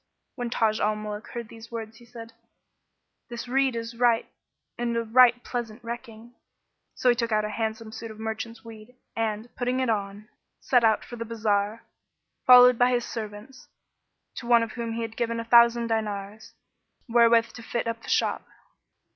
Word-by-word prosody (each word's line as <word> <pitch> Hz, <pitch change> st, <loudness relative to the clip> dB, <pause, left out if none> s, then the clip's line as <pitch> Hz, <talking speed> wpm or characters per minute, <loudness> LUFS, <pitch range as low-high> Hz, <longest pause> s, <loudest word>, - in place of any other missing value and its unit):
When 245 Hz, -2 st, -4 dB
Taj 220 Hz, -2 st, +1 dB
al 215 Hz, +1 st, +1 dB
Muluk 210 Hz, 0 st, -6 dB
heard 235 Hz, -2 st, -7 dB
these 230 Hz, 0 st, -12 dB
words, 225 Hz, -1 st, -7 dB
he 240 Hz, -, -17 dB
said, 230 Hz, -1 st, -11 dB, 1.0 s
'This 235 Hz, +1 st, -6 dB
rede 265 Hz, 0 st, +1 dB
is 230 Hz, 0 st, -5 dB
right 235 Hz, -1 st, +2 dB, 0.5 s
and 235 Hz, -1 st, -2 dB
a 230 Hz, -, 0 dB
right 245 Hz, +1 st, +5 dB
pleasant 235 Hz, -2 st, -5 dB
recking." 235 Hz, 0 st, -8 dB, 0.6 s
So 250 Hz, -, +2 dB
he 240 Hz, -, +4 dB
took 235 Hz, -1 st, -2 dB
out 215 Hz, 0 st, +2 dB
a -, -, -3 dB
handsome 220 Hz, 0 st, -4 dB
suit 225 Hz, 0 st, -8 dB
of 220 Hz, 0 st, -11 dB
merchant's 220 Hz, +1 st, -6 dB
weed, 225 Hz, +2 st, -12 dB, 0.2 s
and, 220 Hz, +1 st, -3 dB
putting 250 Hz, +1 st, -1 dB
it 255 Hz, -3 st, +1 dB
on, 205 Hz, 0 st, -4 dB, 0.3 s
set 245 Hz, -2 st, +2 dB
out 220 Hz, -1 st, +3 dB
for 240 Hz, -, -9 dB
the 230 Hz, -, -4 dB
bazar, 215 Hz, -1 st, -1 dB, 0.6 s
followed 250 Hz, -1 st, +8 dB
by 245 Hz, 0 st, +5 dB
his 245 Hz, -1 st, 0 dB
servants, 220 Hz, +3 st, -8 dB, 0.7 s
to 235 Hz, -, -7 dB
one 235 Hz, -1 st, +5 dB
of 225 Hz, -, -5 dB
whom 230 Hz, -2 st, -4 dB
he 230 Hz, 0 st, -3 dB
had 225 Hz, 0 st, -6 dB
given 230 Hz, -1 st, -2 dB
a 230 Hz, -, -5 dB
thousand 235 Hz, 0 st, +5 dB
dinars, 215 Hz, -2 st, -4 dB, 0.5 s
wherewith 230 Hz, -1 st, +4 dB
to 240 Hz, -, -10 dB
fit 235 Hz, +1 st, -3 dB
up 230 Hz, 0 st, -3 dB
the -, -, -10 dB
shop. -, -, 0 dB
230 Hz, 180 wpm, -26 LUFS, 220-240 Hz, 1.0 s, followed